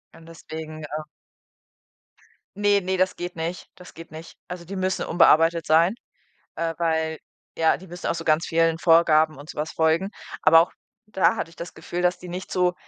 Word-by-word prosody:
Und 165 Hz, -, -15 dB
deswegen, 160 Hz, -1 st, -9 dB
ähm 155 Hz, 0 st, -6 dB, 1.5 s
ne, 205 Hz, 0 st, +3 dB
ne, 190 Hz, 0 st, -2 dB
das 185 Hz, 0 st, +1 dB
geht 175 Hz, 0 st, -5 dB
nicht. 165 Hz, +2 st, -5 dB
Das 180 Hz, -, -14 dB
geht 165 Hz, 0 st, -11 dB
nicht. 160 Hz, +1 st, -11 dB
Also, 180 Hz, -1 st, -7 dB
die 195 Hz, +3 st, -7 dB
müssen 185 Hz, 0 st, -1 dB
unbearbeitet 165 Hz, 0 st, +4 dB
sein, 165 Hz, +5 st, +4 dB, 0.6 s
äh, 165 Hz, 0 st, -2 dB
weil, 160 Hz, -1 st, 0 dB, 0.4 s
ja, 160 Hz, -1 st, +3 dB
die 190 Hz, -, -14 dB
müssen 175 Hz, 0 st, -6 dB
auch -, -, 0 dB
so 165 Hz, -, -5 dB
ganz 155 Hz, 0 st, +2 dB
vielen 165 Hz, 0 st, +2 dB
Vorgaben 160 Hz, -2 st, +4 dB
und 145 Hz, +3 st, -12 dB
so -, -, -9 dB
was 155 Hz, +1 st, -2 dB
folgen. 160 Hz, +4 st, +1 dB, 0.3 s
Aber 165 Hz, +1 st, +7 dB
auch 170 Hz, -, -2 dB, 0.3 s
da 200 Hz, -3 st, +2 dB
hatte -, -, -4 dB
ich 165 Hz, -, -18 dB
das 170 Hz, -, -7 dB
Gefühl, 175 Hz, -, -5 dB
dass 180 Hz, 0 st, +2 dB
die 180 Hz, -, -10 dB
nicht 180 Hz, +2 st, -6 dB
zu 180 Hz, -1 st, +2 dB
165 Hz, 190 wpm, -24 LUFS, 160-180 Hz, 1.5 s, Aber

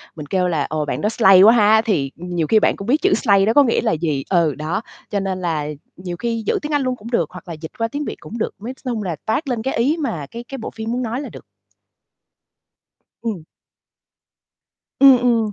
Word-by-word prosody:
mình 150 Hz, -, -7 dB
kêu 180 Hz, +4 st, 0 dB
là 160 Hz, -5 st, 0 dB
"Ồ, 155 Hz, -1 st, -1 dB
bạn -, -, -3 dB
đó 210 Hz, -, +1 dB
slay 195 Hz, -5 st, +6 dB
quá 220 Hz, +4 st, +8 dB
ha!" 220 Hz, -1 st, +5 dB
thì 160 Hz, -12 st, -1 dB
nhiều 175 Hz, -2 st, -3 dB
khi 220 Hz, +4 st, +4 dB
bạn -, -, +2 dB
cũng 200 Hz, -, -8 dB
biết 290 Hz, +5 st, +2 dB
chữ 390 Hz, 0 st, +3 dB
slay 200 Hz, -2 st, +3 dB
đó 225 Hz, -, +2 dB
có 290 Hz, -, +6 dB
nghĩa 235 Hz, -3 st, +1 dB
là 230 Hz, -, +1 dB
gì, 155 Hz, -4 st, -1 dB
ừ, 170 Hz, -6 st, +2 dB
đó, 155 Hz, +8 st, -3 dB, 0.3 s
cho 205 Hz, -, -1 dB
nên 190 Hz, -1 st, -3 dB
là 155 Hz, -4 st, -1 dB, 0.3 s
nhiều 180 Hz, -1 st, -6 dB
khi 230 Hz, 0 st, -2 dB
giữ -, -, +1 dB
tiếng 300 Hz, -, -5 dB
Anh 290 Hz, -1 st, +2 dB
luôn 255 Hz, -1 st, -1 dB
cũng 230 Hz, +1 st, -11 dB
được 170 Hz, -10 st, +1 dB
hoặc 180 Hz, 0 st, -11 dB
là 170 Hz, -, -5 dB
dịch 160 Hz, 0 st, -9 dB
qua 230 Hz, -1 st, 0 dB
tiếng 290 Hz, +5 st, -4 dB
Việt -, -, -4 dB
cũng 230 Hz, -, -8 dB
được. 220 Hz, -, -2 dB
Nói 245 Hz, +5 st, -5 dB
s -, -, -26 dB
chung 225 Hz, -4 st, -2 dB
là 175 Hz, -4 st, -3 dB
toát 230 Hz, +8 st, -1 dB
lên 240 Hz, -3 st, -1 dB
cái 265 Hz, -, -1 dB
ý 275 Hz, +8 st, +2 dB
mà 175 Hz, -, -3 dB
cái 235 Hz, +1 st, -7 dB
cái 270 Hz, +3 st, -8 dB
bộ 225 Hz, -, -6 dB
phim 225 Hz, 0 st, -4 dB
muốn 250 Hz, +1 st, -1 dB
nói 235 Hz, +4 st, -3 dB
là -, -, -7 dB
được. -, -, -12 dB, 1.8 s
Ừm. 215 Hz, -8 st, -4 dB, 1.6 s
Ừm, 270 Hz, -2 st, +8 dB
ừm. 230 Hz, -3 st, +1 dB
215 Hz, 245 wpm, -20 LUFS, 175-240 Hz, 1.8 s, quá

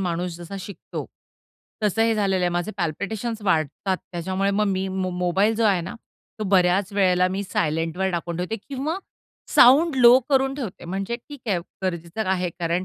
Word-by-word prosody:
माणूस 175 Hz, -1 st, -2 dB
जसा 175 Hz, +3 st, -9 dB
शिकतो, 200 Hz, +1 st, -7 dB, 0.8 s
तसं 215 Hz, +2 st, +2 dB
हे 225 Hz, 0 st, +3 dB
झालेलं 195 Hz, -3 st, +1 dB
आहे. 175 Hz, -, +3 dB
माझे 175 Hz, +4 st, -1 dB
पल्पिटेशन्स 210 Hz, +7 st, -3 dB
वाढतात 185 Hz, +1 st, 0 dB, 0.2 s
त्याच्यामुळे 190 Hz, +3 st, -1 dB
मग 210 Hz, +1 st, +1 dB
मी 190 Hz, -1 st, 0 dB
म 190 Hz, -1 st, -2 dB
मोबाईल 190 Hz, +5 st, +2 dB
जो 230 Hz, -, +1 dB
आहे 195 Hz, -4 st, +3 dB
ना, 175 Hz, +3 st, -6 dB, 0.4 s
तो 215 Hz, -, -2 dB
बऱ्याच 190 Hz, +1 st, +3 dB
वेळेला 185 Hz, -2 st, +3 dB
मी 195 Hz, +2 st, -2 dB
सायलेंटवर 165 Hz, +2 st, -1 dB
टाकून 170 Hz, -1 st, -3 dB
ठेवते 180 Hz, +5 st, -2 dB
किंवा 285 Hz, +6 st, -2 dB, 0.6 s
साऊंड 290 Hz, +6 st, +7 dB
लो 245 Hz, 0 st, +8 dB
करून 270 Hz, -1 st, +2 dB
ठेवते 235 Hz, -12 st, -6 dB
म्हणजे 195 Hz, +6 st, -3 dB
ठीक 280 Hz, +3 st, -12 dB
आहे, 185 Hz, -4 st, +2 dB, 0.3 s
गरजेचं 175 Hz, +3 st, -3 dB
आहे 185 Hz, -1 st, +1 dB
कारण 170 Hz, +2 st, -2 dB
190 Hz, 170 wpm, -23 LUFS, 175-220 Hz, 0.8 s, लो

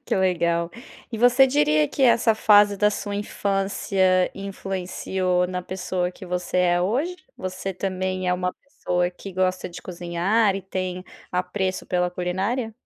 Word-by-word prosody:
Que -, -, -1 dB
legal! 170 Hz, -2 st, +1 dB, 0.4 s
E 225 Hz, -, -5 dB
você 245 Hz, +3 st, +6 dB
diria 155 Hz, -, +3 dB
que 275 Hz, -, -2 dB
essa 235 Hz, -2 st, +5 dB
fase 205 Hz, -2 st, +5 dB
da 210 Hz, +1 st, +3 dB
sua 205 Hz, 0 st, -4 dB
infância 195 Hz, -2 st, +1 dB
influenciou 190 Hz, -2 st, -2 dB
na 180 Hz, 0 st, -3 dB
pessoa 180 Hz, -1 st, -2 dB
que -, -, -11 dB
você 180 Hz, 0 st, -3 dB
é 175 Hz, -1 st, +3 dB
hoje? 265 Hz, -, 0 dB, 0.2 s
Você 185 Hz, +1 st, -5 dB
também 185 Hz, 0 st, -2 dB
é -, -, +3 dB
uma 180 Hz, 0 st, -1 dB
pessoa 180 Hz, -10 st, -2 dB
que 195 Hz, +2 st, -10 dB
gosta 185 Hz, 0 st, 0 dB
de 175 Hz, -, -10 dB
cozinhar 180 Hz, +4 st, +1 dB
e 195 Hz, -, -4 dB
tem 185 Hz, -1 st, -4 dB, 0.3 s
apreço 185 Hz, +1 st, -1 dB
pela 180 Hz, -1 st, +1 dB
culinária? 190 Hz, +7 st, -2 dB
185 Hz, 150 wpm, -24 LUFS, 180-200 Hz, 0.4 s, você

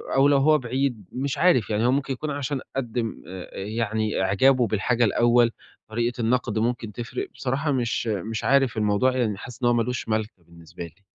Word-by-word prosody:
أو 135 Hz, +1 st, +5 dB
لو 145 Hz, -1 st, +4 dB
هو 155 Hz, +3 st, +5 dB
بعيد، 125 Hz, -4 st, -2 dB
مش 135 Hz, +1 st, -3 dB
عارف 170 Hz, -, +3 dB
يعني 110 Hz, +1 st, +1 dB
هو 125 Hz, -, +4 dB
ممكن 135 Hz, 0 st, 0 dB
يكون 150 Hz, +4 st, -4 dB
عشان 140 Hz, -1 st, -3 dB
قدِّم 120 Hz, -3 st, -3 dB
آآ، 90 Hz, 0 st, -8 dB
يعني 110 Hz, +1 st, -1 dB
إعجابه 120 Hz, +6 st, +3 dB
بالحاجة 110 Hz, +4 st, +1 dB
الأول، 120 Hz, +2 st, +3 dB, 0.4 s
طريقة 120 Hz, +2 st, -1 dB
النقد 115 Hz, -1 st, 0 dB
ممكن 115 Hz, -1 st, -1 dB
تفرِق 125 Hz, -, -5 dB
بصراحة 140 Hz, +4 st, -1 dB
مش 120 Hz, -3 st, -1 dB
مش 110 Hz, +1 st, -3 dB
عارف 135 Hz, -4 st, +3 dB
الموضوع 110 Hz, +5 st, +2 dB
يعني 110 Hz, -5 st, 0 dB
حاسس 125 Hz, +5 st, -10 dB
إن -, -, +4 dB
هو 120 Hz, -, +4 dB
مالوش 120 Hz, +1 st, -1 dB
مالكة 110 Hz, -4 st, -2 dB
بالنسبة 85 Hz, 0 st, -11 dB
لي. 85 Hz, +4 st, -16 dB
120 Hz, 185 wpm, -24 LUFS, 110-130 Hz, 0.4 s, أو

